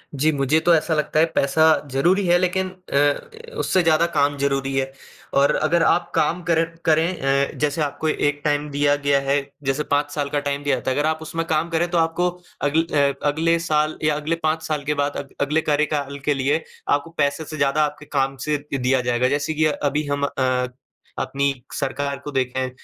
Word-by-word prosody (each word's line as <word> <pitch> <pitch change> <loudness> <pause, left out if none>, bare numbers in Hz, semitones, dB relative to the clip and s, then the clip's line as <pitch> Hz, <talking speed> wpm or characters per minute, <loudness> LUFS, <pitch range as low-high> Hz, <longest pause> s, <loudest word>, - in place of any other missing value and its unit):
जी, 150 +3 +2
मुझे 145 +2 +2
तो 170 +1 +3
ऐसा 160 +1 0
लगता 155 0 0
है, 160 - +6
पैसा 140 +3 +2 0.3
ज़रूरी 175 +9 +2
है, 175 0 +5
लेकिन 185 +1 0 0.2
अ, 445 - -1
उससे 185 -2 +2
ज़्यादा 160 0 +4
काम 145 0 +2
ज़रूरी 135 -1 -1
है 135 0 -1 0.5
और 140 - +3
अगर 165 +2 +2
आप 175 - +2
काम 170 +4 +1
कर 165 0 +4 0.2
करें 155 -4 +2
अ, - - -13
जैसे 150 +1 0
आपको 150 +2 -2
एक 145 -1 0
टाइम 145 0 0
दिया 145 0 +2
गया 140 -1 +4
है, 140 +1 +3 0.2
जैसे 135 +2 0
5 145 0 +1
साल 145 -2 -1
का 145 - 0
टाइम 145 0 -3
दिया 145 -2 +2
जाता 130 +1 -2
है। 130 - -1
अगर 150 +1 +2
आप 160 0 -2
उसमें 165 +1 -3
काम 160 +2 0
करें, 170 +1 +1
तो 175 - +1
आपको 165 +2 +1 0.3
अगल 150 +3 +2
अ, 140 -1 +3
अगले 165 +3 +2
साल 155 -2 0
या 155 -1 +2
अगले 150 +3 -1
5 160 +1 +1
साल 150 -2 -2
के 150 - 0
बाद 145 0 -3
अग 140 - -7
अगले 150 +3 +1
कार्यकाल 145 -2 -1
के 150 - +3
लिए 140 +4 0 0.3
आपको 145 +3 +1
पैसे 145 +1 0
से 155 - -7
ज़्यादा 140 +2 +2
आपके 150 0 -7
काम 135 -2 -1
से 150 -1 +2 0.2
दिया 130 0 +1
जाएगा। 125 0 +1
जैसे 145 +3 -1
कि 155 0 +1
अभी 150 0 0
हम 145 0 -1
अ, 130 -2 0 0.5
अपनी 140 +1 0 0.2
सरकार 140 +1 -2
को 145 - -6
देखें, 130 -1 -1
145 Hz, 205 wpm, -22 LUFS, 140-160 Hz, 0.5 s, है